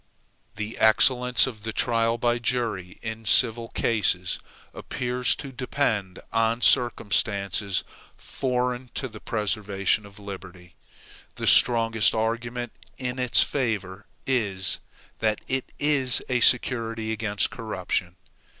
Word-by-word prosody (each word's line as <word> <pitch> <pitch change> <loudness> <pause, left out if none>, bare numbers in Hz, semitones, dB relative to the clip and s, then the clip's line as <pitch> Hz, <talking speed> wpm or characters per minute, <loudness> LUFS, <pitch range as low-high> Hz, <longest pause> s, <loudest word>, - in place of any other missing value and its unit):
The 110 +1 -6
excellence 125 +2 +4
of 115 -5 -7
the 110 +1 -4
trial 115 0 +1
by 120 0 0
jury 115 -7 -2
in 110 0 -6
civil 115 +2 +5
cases 100 -6 0 0.3
appears 125 0 -1
to 140 - -8
depend 115 -7 -2 0.2
on 115 +1 +1
circumstances 100 -5 +1 0.3
foreign 125 -1 -3
to 135 - -2
the 110 -3 -11
preservation 105 -1 -1
of 100 +1 -16
liberty. 95 -3 -10 0.6
The - - -4
strongest 115 -3 +5
argument 120 +2 -2 0.3
in 125 0 -4
its 125 -2 +4
favor 105 -7 -3 0.2
is, 100 -8 0 0.4
that 110 -1 0
it 130 0 -3
is 140 -4 +2
a 125 -1 0
security 115 -2 +2
against 105 -2 -1
corruption. 95 -5 -3
115 Hz, 115 wpm, -25 LUFS, 105-125 Hz, 0.6 s, civil